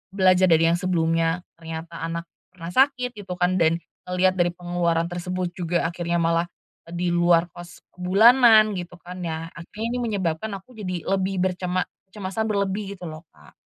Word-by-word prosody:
belajar 185 -1 +5
dari 165 0 +5
yang 170 - +1
sebelumnya, 165 -1 +1 0.2
ternyata 165 +1 -7
anak 165 +1 -3 0.3
pernah 175 -2 -8
sakit 255 -1 +3
gitu 195 -3 -6
kan, 180 +1 +1
dan 165 0 +3 0.3
ngelihat 185 +1 +3
dari 175 0 +4
pengeluaran 175 -2 0
tersebut 180 0 -3
juga 175 -2 -1
akhirnya 170 0 -1
malah 165 +1 +1 0.4
di 175 +1 -1
luar 175 -1 +4
cost 175 0 -12 0.2
bulanan 220 +3 +6
gitu 175 0 -8
kan, 180 +1 -9
ya 165 -1 -3
akhirnya 205 +6 -7
ini - - -1
menyebabkan 190 0 -2
aku 195 +6 -19
jadi 185 -5 -4
lebih 195 0 0
bercema 180 0 0 0.3
cemasan 210 +2 -2
berlebih 200 -1 -2
gitu 185 - -14
loh 155 +1 -11
Kak. 75 -1 -18
180 Hz, 165 wpm, -24 LUFS, 170-190 Hz, 0.4 s, bulanan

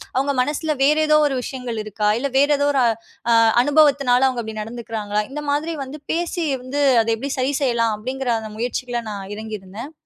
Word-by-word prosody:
அவுங்க 275 +2 +1
மனசுல 300 +3 -1
வேற 295 +2 +5
ஏதோ 305 0 +5
ஒரு 270 - -2
விஷயங்கள் 250 -4 -5
இருக்கா? 210 0 -1
இல்ல 280 +2 -1
வேற 285 +2 +4
ஏதோ 285 - +2
ஒரு 270 - +2 0.5
அ - - +6 0.3
அனுபவத்தினால 280 -3 +4
அவுங்க 250 -2 -2
அப்பிடி 220 -1 -5
நடந்துக்கிறாங்களா? 215 -2 -3
இந்த 295 +2 -5
மாதிரி 315 +3 -1
வந்து 280 +4 -9
பேசி 340 0 -2 0.2
வந்து, 275 +3 -2 0.2
அத 225 - -3
எப்பிடி 270 +5 -5
சரி 260 +3 0
செய்யலாம்? 230 -4 +1
அப்பிடிங்கிற 255 +3 -3
அந்த 215 -1 -8
முயற்சிகள்ல 245 0 -2
நான் 200 -2 -6
இறங்கியிருந்தேன். 215 +3 -7
255 Hz, 180 wpm, -21 LUFS, 220-285 Hz, 0.5 s, அ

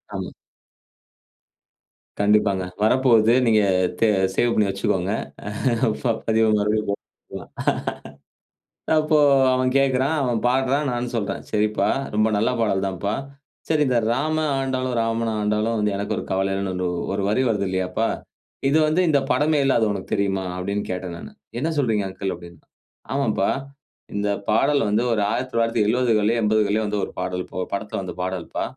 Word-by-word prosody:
ஆமா. - - -4 1.9
கண்டிப்பாங்க. 100 -2 +3 0.2
வரப்போகுது. 115 -1 +4
நீங்க 110 -2 +4 0.4
தே 115 - +4 0.3
சேவ் 120 -1 +2
பண்ணி 105 - +3
வச்சுக்கோங்க. 95 -1 -1 1.2
பதிவு 110 0 +3
மறுபடியும் 105 +1 0
போட்டுட்டுரலாம். 100 - -8 1.5
அப்போ, 155 0 +2 0.4
அவன் 130 0 +1
கேட்குறான் 135 +2 +2
அவன் 120 -3 0
பாடுறான், 135 +3 +1
நானும் 120 0 -3
சொல்றேன். 105 -3 -2
"சரிப்பா, 105 0 +1 0.3
ரொம்ப 110 +1 +3
நல்ல 110 +4 +2
பாடல் 100 -3 +1
தான்பா. 100 +2 -3 0.5
சரி, 155 -2 +2
இந்த 125 -2 +2
ராமன் 155 +3 0
ஆண்டாலும், 130 -2 -1
ராவண 115 0 -1
ஆண்டாலும் 105 +2 0
வந்து 105 0 +1
எனக்கு 100 - -2
ஒரு - - -3
கவல 95 +1 0
இல்லன்னு 95 -2 -2 0.3
ஒரு 100 - -1
வரி 110 +5 +2
வருதில்லையாப்பா? 95 +1 -1 0.6
இது 150 - +3
வந்து 155 +4 +2
இந்த 145 -2 +4
படமே 150 +3 +2
இல்ல, 135 - +3
அது 110 - +2
உனக்கு 100 -2 -6
தெரியுமா?"அப்படின்னு 95 0 -2
கேட்டேன் 90 -1 -4
நானு. - - -10 0.3
"என்ன 160 +4 -1
சொல்றீங்க 110 -8 +1
அங்கிள்?", 95 0 -4
அப்டின்னா. 85 -2 -14 0.5
"ஆமாம்பா, 115 -8 +1 0.7
இந்த 105 0 0 0.2
பாடல் 140 +6 +3
வந்து 105 +3 +2
ஒரு 105 - 0
1970கள்லயோ 115 -2 +1
80கள்லயோ 110 0 +2
வந்து, 105 0 -1
ஒரு - - -11
பாடல்ப்பா. 90 0 -4
ஒரு - - -10
படத்துல 105 -1 -3
வந்த 90 - -6
பாடல்ப்பா. 90 -2 -3
110 Hz, 135 wpm, -23 LUFS, 100-125 Hz, 1.9 s, வரப்போகுது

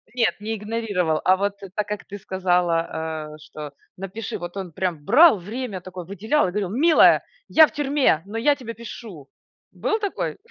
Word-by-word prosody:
Нет, 230 -3 +1
не 220 +2 -3
игнорировал. 205 -7 -1
А, 185 +1 +4
вот 200 +1 -2 0.2
так, 210 -1 -1
как 210 0 -5
ты 205 - -8
сказала, 170 -5 -1
э, - - -13
что 150 -1 -9 0.2
напиши, 195 +3 -5
вот 175 +2 -7
он 185 -3 -5
прям 170 -3 -3
брал 295 +3 +7
время 210 +1 -5
такое, 180 -1 -8
выделял 205 - 0
и - - -3
говорил: 195 -1 -2
"Милая, 310 - +5 0.2
я 315 -1 +7
в - - -14
тюрьме, 285 - +1
но 210 +3 -6
я 285 +6 +3
тебе 245 -5 -7
пишу". 215 - -10 0.4
Был 435 - -1
такой? 405 -2 -3
200 Hz, 175 wpm, -23 LUFS, 180-230 Hz, 0.4 s, брал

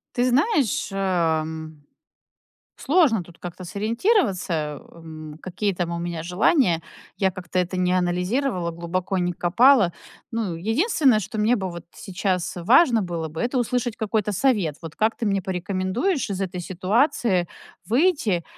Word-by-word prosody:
Ты 245 - +2
знаешь, 280 - +2
а, 175 -5 +1
м, 160 -1 -8 0.9
сложно 280 - +3
тут 170 -1 -17
как-то 180 +1 -8
сориентироваться, 195 - 0
м, 155 -2 -10
какие 190 +3 -2
там 175 -1 -2
у 170 - -3
меня 170 -1 -4
желания. 180 - +2 0.3
Я 190 -1 +2
как-то 185 0 -5
это 180 +1 -1
не 180 0 +1
анализировала, 180 +3 0
глубоко 175 +3 -3
не 180 -1 0
копала. 195 +3 +4 0.4
Ну, 225 -6 -2
единственное, 240 - +2
что 215 +3 -6
мне 225 +4 +3
бы 190 -2 -3
вот 170 -1 -8
сейчас 185 -2 -2
важно 230 - +4
было 170 -4 -3
бы- 155 +1 -7
это 250 +2 -1
услышать 245 -1 -1
какой-то 215 -1 -1
совет. 200 - +1
Вот 165 -2 -8
как 220 +1 +1
ты 230 - -3
мне 195 -2 +1
порекомендуешь 190 - -1
из 195 -1 -3
этой 185 -1 -4
ситуации 190 - +1 0.4
выйти 235 - +2
190 Hz, 145 wpm, -23 LUFS, 175-230 Hz, 0.9 s, копала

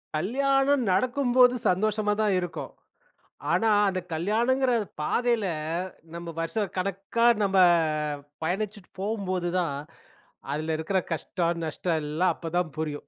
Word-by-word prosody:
கல்யாணம் 270 - +2
நடக்கும்போது 250 +4 +4
சந்தோஷமாதான் 210 +1 +1
இருக்கும். 175 -2 -5 0.8
ஆனா, 220 +6 +3 0.2
அந்த 185 -1 -2
கல்யாணங்கிற 235 +10 +1 0.3
பாதையில 235 +5 +1 0.7
நம்ம 170 0 -7
வருஷ 165 +6 -2 0.2
கணக்கா 195 +5 -1 0.2
நம்ப 195 -1 +1 0.9
பயணிச்சிட்டு 200 +3 -3
போம்போதுதான், 185 -6 -1 0.8
அதில 155 +1 -1
இருக்கிற 175 +5 0
கஷ்டம், 170 +1 -2
நஷ்டம் 160 +1 -1
எல்லாம் 160 +4 +1
அப்பதான் 170 0 -2
புரியும். 150 -2 -4
190 Hz, 95 wpm, -27 LUFS, 170-225 Hz, 0.9 s, நடக்கும்போது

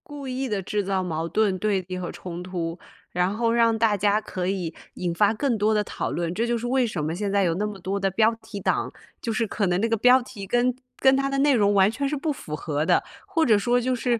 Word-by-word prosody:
故 290 -2 -7
意 260 +1 -2
地 205 -2 -1
制 205 +2 -2
造 190 -1 -1
矛 165 -2 -2
盾、 200 +1 +1
对 200 -1 +1
立 185 0 -4
和 180 -1 -4
冲 175 -1 -7
突， 175 -2 -4 0.3
然 180 +2 +1
后 230 +1 +1
让 230 -1 +3
大 220 -2 +3
家 205 +1 +2
可 185 -4 -4
以 185 -4 -2 0.2
引 175 -2 -2
发 205 +4 +3
更 240 0 0
多 215 +1 +2
的 210 -1 +2
讨 - - -4
论。 170 0 -2
这 225 +5 0
就 240 0 +1
是 235 +1 -4
为 255 0 +2
什 175 -8 -3
么 160 +2 -2
现 200 +2 -2
在 200 0 +3
有 170 -3 +2
那 205 +4 -1
么 205 -2 -7
多 195 +2 -2
的 195 0 +1
标 220 +4 +3
题 205 - -8
党， - - 0 0.3
就 230 - -2
是 225 +1 0
可 205 -1 -1
能 180 0 +1
那 225 - +1
个 225 - +1
标 250 +4 +5
题， 240 -5 -9
跟 245 +3 +2 0.2
跟 265 0 +5
它 275 0 0
的 275 - -1
内 285 +1 +4
容 205 -4 +3
完 195 0 +5
全 275 +6 -2
是 300 - -1
不 305 +3 -1
符 155 - -6
合 150 -1 -2
的。 - - +3 0.2
或 330 -5 +1
者 220 -4 +5
说 240 +4 +2
就 255 +1 0
是 240 -1 0
210 Hz, 290 characters per minute, -25 LUFS, 185-240 Hz, 0.3 s, 标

